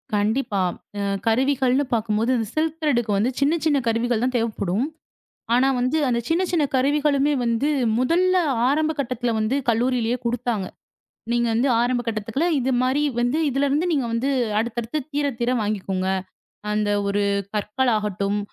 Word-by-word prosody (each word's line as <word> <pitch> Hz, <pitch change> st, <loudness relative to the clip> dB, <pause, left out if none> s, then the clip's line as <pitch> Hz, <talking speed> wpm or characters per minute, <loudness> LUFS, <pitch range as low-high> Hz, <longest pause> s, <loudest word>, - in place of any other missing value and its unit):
கண்டிப்பா. 210 Hz, 0 st, 0 dB, 0.4 s
அ -, -, -1 dB, 0.3 s
கருவிகள்ன்னு 265 Hz, +3 st, +2 dB
பாக்கும்போது 225 Hz, +1 st, +1 dB
அந்த 225 Hz, -2 st, -2 dB
சில்க் 320 Hz, +1 st, -1 dB
திரேட்க்கு 240 Hz, -8 st, +1 dB
வந்து 225 Hz, +6 st, +1 dB
சின்ன 285 Hz, +3 st, +3 dB
சின்ன 295 Hz, -3 st, +3 dB
கருவிகள் 230 Hz, 0 st, +1 dB
தான் 255 Hz, 0 st, 0 dB
தேவப்படும். 220 Hz, 0 st, -1 dB, 0.7 s
ஆனா 250 Hz, +2 st, +4 dB
வந்து 255 Hz, +6 st, +1 dB
அந்தச் 235 Hz, -1 st, -1 dB
சின்ன 330 Hz, +3 st, +2 dB
சின்ன 335 Hz, -4 st, +2 dB
கருவிகளுமே 285 Hz, +1 st, +2 dB
வந்து 235 Hz, +5 st, +1 dB, 0.3 s
முதல்ல 355 Hz, +8 st, +2 dB, 0.4 s
ஆரம்ப 310 Hz, +2 st, +1 dB
கட்டத்துல 245 Hz, -2 st, -1 dB
வந்து 215 Hz, +4 st, 0 dB
கல்லூரியிலே 240 Hz, 0 st, +1 dB
குடுத்தாங்க. 235 Hz, -4 st, -1 dB, 0.7 s
நீங்க 240 Hz, 0 st, +1 dB
வந்து 240 Hz, +5 st, +2 dB
ஆரம்ப 245 Hz, 0 st, +1 dB
கட்டத்துல 225 Hz, +8 st, -1 dB
இது 260 Hz, +1 st, 0 dB
மாரி 260 Hz, +3 st, +1 dB, 0.2 s
வந்து 245 Hz, +5 st, +1 dB
இதுலருந்து 280 Hz, +5 st, +1 dB
நீங்க 280 Hz, -6 st, +1 dB
வந்து 240 Hz, +4 st, 0 dB, 0.3 s
அடுத்தடுத்துத் 235 Hz, +5 st, -3 dB
தீரத் 285 Hz, -4 st, -1 dB
தீர 240 Hz, +1 st, +1 dB
வாங்கிக்கோங்க. 195 Hz, -3 st, -2 dB, 0.6 s
அந்த 210 Hz, 0 st, 0 dB, 0.2 s
ஒரு 200 Hz, +1 st, +1 dB, 0.3 s
கற்களாகட்டும். 210 Hz, -3 st, 0 dB
245 Hz, 140 wpm, -23 LUFS, 225-280 Hz, 0.7 s, ஆனா